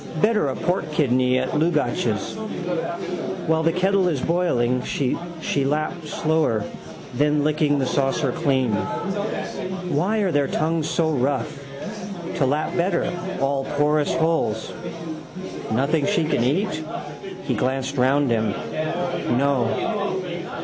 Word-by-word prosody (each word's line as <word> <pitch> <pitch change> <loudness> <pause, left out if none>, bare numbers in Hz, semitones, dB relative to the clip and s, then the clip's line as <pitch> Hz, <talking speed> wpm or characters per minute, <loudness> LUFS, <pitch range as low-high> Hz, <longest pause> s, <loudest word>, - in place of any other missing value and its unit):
Better 215 -7 +3
a 130 - -2
pork 175 -4 -1
kidney 130 -4 +3
at 130 0 0
Dlugacz's. 150 -8 +1 1.1
While 160 0 +3
the 165 - +4
kettle 190 +2 +3
is 155 -6 +1
boiling. 125 -8 +1
She 135 -3 0 0.5
lapped 155 +3 -1
slower, 155 -9 +1 0.5
then 150 +3 +2
licking 150 -1 +2
the 135 - +1
saucer 135 +1 +1
clean. 135 -8 +1
Why 185 - -2
are 190 -3 +2
their 145 -3 +2
tongues 160 +1 0
so 160 -2 +2
rough? 140 0 -1 0.7
To 140 - +3
lap 150 +3 0
better, 175 0 +1 0.3
all 135 0 +1
porous 150 0 +3
holes. 160 -10 +1 1.0
Nothing 140 +6 +2
she 200 -5 +2
can 150 -6 +1
eat? 155 - +1 0.6
He 130 - 0
glanced 130 +4 -1
round 135 +1 +3
him. 110 -3 +2 0.8
No. 140 - +1
150 Hz, 115 wpm, -23 LUFS, 130-165 Hz, 1.1 s, the